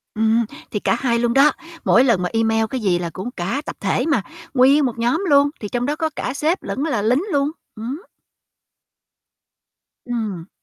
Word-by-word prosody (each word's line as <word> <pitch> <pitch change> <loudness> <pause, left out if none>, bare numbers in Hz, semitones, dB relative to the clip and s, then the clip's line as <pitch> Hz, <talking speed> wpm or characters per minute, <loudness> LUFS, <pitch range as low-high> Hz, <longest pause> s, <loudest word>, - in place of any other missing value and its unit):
Ừm, 225 +1 +2 0.3
thì 210 - -1
cả - - +1
hai 235 -3 +1
luôn 235 0 +1
đó, 280 +3 +6 0.3
mỗi 245 - +5
lần 230 -8 +3
mà 180 - -1
email 225 0 +2
cái 260 - -3
gì 180 -4 +2
là 175 -1 -3
cũng 190 +9 -6
cả 195 +8 -3
tập - - -5
thể - - 0
mà, 275 -9 +2 0.3
nguyên 275 +3 +5
một 240 -3 -2
nhóm 245 +10 +1
luôn, 285 0 +5
thì 210 - -5
trong 245 +2 -1
đó 295 +2 -1
có 320 0 -1
cả 250 - -3
sếp 315 +6 0
lẫn 270 - -3
là 275 -9 0
lính 245 - +2
luôn. 285 -1 +1 0.2
Ừm 220 0 -7
hứm. 295 +8 -5 2.0
Ừm. 215 -8 -4
240 Hz, 200 wpm, -21 LUFS, 220-280 Hz, 2.0 s, đó